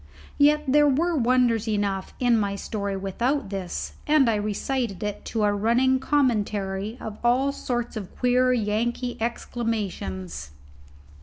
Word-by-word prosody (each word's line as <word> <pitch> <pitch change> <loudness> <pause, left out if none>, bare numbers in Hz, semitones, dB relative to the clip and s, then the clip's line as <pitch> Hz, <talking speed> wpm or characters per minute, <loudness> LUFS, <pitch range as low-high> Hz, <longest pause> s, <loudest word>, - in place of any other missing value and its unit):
Yet 300 +1 +5
there 295 +2 +5
were 330 +5 +2
wonders 240 -3 +2
enough 200 -3 -1
in 245 -2 +3
my 200 -1 -1
story 200 -1 -3
without 235 +6 -1
this, 190 -3 -4
and 295 -3 +5
I 230 - +3
recited 215 +1 -2
it 210 -1 -4
to 220 -2 -1
a 205 0 +3
running 240 +5 +2
commentary 215 -6 0
of 215 -1 -7
all 255 +4 +3
sorts 240 -4 -3
of 205 -4 -7
queer 250 0 +3
Yankee 240 +2 -1
exclamations. 190 - -3
230 Hz, 135 wpm, -25 LUFS, 205-255 Hz, -, Yet